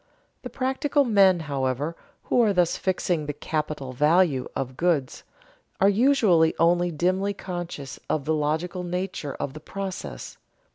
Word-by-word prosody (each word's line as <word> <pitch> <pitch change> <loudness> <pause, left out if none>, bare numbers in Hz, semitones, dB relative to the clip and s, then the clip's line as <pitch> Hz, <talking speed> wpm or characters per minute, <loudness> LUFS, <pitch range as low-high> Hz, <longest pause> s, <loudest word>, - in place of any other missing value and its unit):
The 250 - -7
practical 270 +3 0
men, 195 -6 +4
however, 140 +1 -2 0.3
who 245 - +2
are 215 -3 +3
thus 180 -2 +2
fixing 180 -4 -1
the 150 - -2
"capital 150 -3 -4
value" 150 0 +3
of 130 -1 -3
goods, 155 -5 0 0.6
are 195 - +5
usually 205 -8 +4
only 175 +1 +3
dimly 185 +5 0
conscious 175 -8 -6
of 145 -3 -1
the 160 - +1
logical 160 +4 -1
nature 180 -5 -4
of 135 - -4
the 155 - -8
process. 195 +3 -7
175 Hz, 140 wpm, -25 LUFS, 150-190 Hz, 0.6 s, are